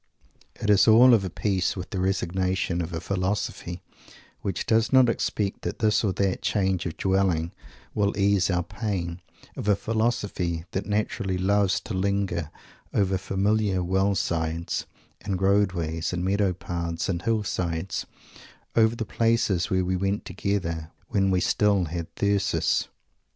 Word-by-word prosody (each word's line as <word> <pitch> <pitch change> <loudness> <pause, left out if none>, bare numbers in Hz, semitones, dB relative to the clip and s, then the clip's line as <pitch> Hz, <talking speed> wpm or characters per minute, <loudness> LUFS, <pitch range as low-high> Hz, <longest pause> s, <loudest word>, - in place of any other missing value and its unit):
It 105 - 0
is 100 +2 +5
all 120 +3 +8
of 110 -4 +4
a 95 - -2
piece 95 +1 0
with 90 -1 -7
the 95 - -2
"resignation" 95 -1 0
of 85 0 -4
a 80 - -3
philosophy 95 -1 -3 0.6
which 95 -4 -3
does 110 0 +2
not 130 -2 +6
expect 105 -3 -1
that - - -4
this 110 0 +2
or 100 - +2
that 95 0 0
change 95 -4 0
of 80 - -6
dwelling 95 -4 +1 0.4
will 100 -1 0
ease 100 -2 +3
our 90 -2 +1
pain; 90 -4 -4 0.3
of - - -5
a 105 - +5
philosophy 105 -7 -1
that 95 - -3
naturally 105 -2 -1
loves 100 +1 +2
to - - -6
linger 95 -4 -1 0.4
over 95 -1 +1
familiar 100 0 0
well 95 +3 +1
sides 85 -1 -2 0.4
and 95 -2 -2
roadways 90 -5 +1
and 90 0 -2
meadow 100 0 +2
paths 85 -2 -3
and 85 -3 -1
hillsides, 95 -5 -2 0.7
over 110 0 +4
the 115 - -3
places 115 -6 +1
where 95 -1 +1
we 95 +1 0
went 95 +2 -1
together, 85 -6 -2 0.2
when 95 -2 +2
we 95 -1 +2
"still 100 0 +2
had 85 +1 -4
Thyrsis." 100 -1 +1
95 Hz, 150 wpm, -26 LUFS, 90-105 Hz, 0.7 s, all